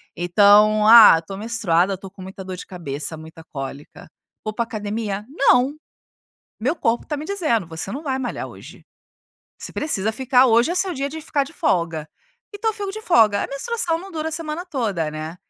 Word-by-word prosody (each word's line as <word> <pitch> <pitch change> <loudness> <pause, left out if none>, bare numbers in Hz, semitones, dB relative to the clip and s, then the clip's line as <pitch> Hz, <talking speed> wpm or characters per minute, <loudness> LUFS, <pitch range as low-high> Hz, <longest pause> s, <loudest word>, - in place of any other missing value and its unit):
Então, 205 +4 +4
ah, 220 -7 +9
tô 195 +4 -9
menstruada, 195 -4 0
tô 195 +1 -10
com 190 0 -15
muita 190 +1 -9
dor 185 0 -6
de - - -9
cabeça, 160 -3 -4
muita 160 +1 -12
cólica. 140 -2 -9 0.4
Vou 215 - -4
pra 235 +2 -1
academia? 210 -2 -4
Não! 275 -1 +3 0.9
Meu 270 +9 0
corpo 230 -5 -1
tá 300 - -3
me 295 - -6
dizendo: 310 - -1
"Você 165 +3 -6
não 275 +8 -5
vai 265 -2 -1
malhar 245 - -4
hoje". - - -14 0.7
Você - - -8
precisa 220 -9 0
ficar 260 +1 +3
hoje 235 +7 +3
é - - -3
seu 370 -1 +1
dia 275 -1 -3
de 315 +3 -7
ficar 295 -2 -1
de 275 - -13
folga. 165 - -1 0.5
Então 440 +2 -1
fico 410 -2 -5
de 435 - -7
folga. 225 - +3
A - - -3
menstruação 330 +3 -1
não 385 +3 -10
dura 315 -2 -3
a - - -8
semana 320 +1 -4
toda, 210 - -2
né. 155 +2 -7
225 Hz, 190 wpm, -21 LUFS, 185-300 Hz, 0.9 s, ah